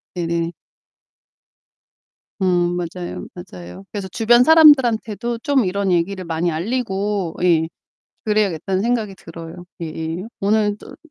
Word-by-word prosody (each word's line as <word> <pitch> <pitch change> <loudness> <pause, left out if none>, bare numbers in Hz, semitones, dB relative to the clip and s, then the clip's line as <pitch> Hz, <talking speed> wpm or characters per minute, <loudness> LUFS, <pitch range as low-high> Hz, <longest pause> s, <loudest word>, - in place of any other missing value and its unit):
네네. 170 -1 -1 1.9
음 175 -1 +2
맞아요. 175 0 -5
맞아요. 90 - -10
그래서 200 -2 -5
'주변 230 +6 +4
사람들한테도 240 -7 +4
좀 275 -3 +1
이런 195 0 0
얘기를 185 +2 0
많이 165 +1 -1
알리고' 195 -1 -2
예 165 -2 +3 0.6
'...그래야겠다.'는 195 -3 0
생각이 225 -4 -1
들어요. 165 0 -10 0.2
예예. 160 +1 -4 0.2
오늘도 210 0 0
190 Hz, 265 characters per minute, -20 LUFS, 170-220 Hz, 1.9 s, 주변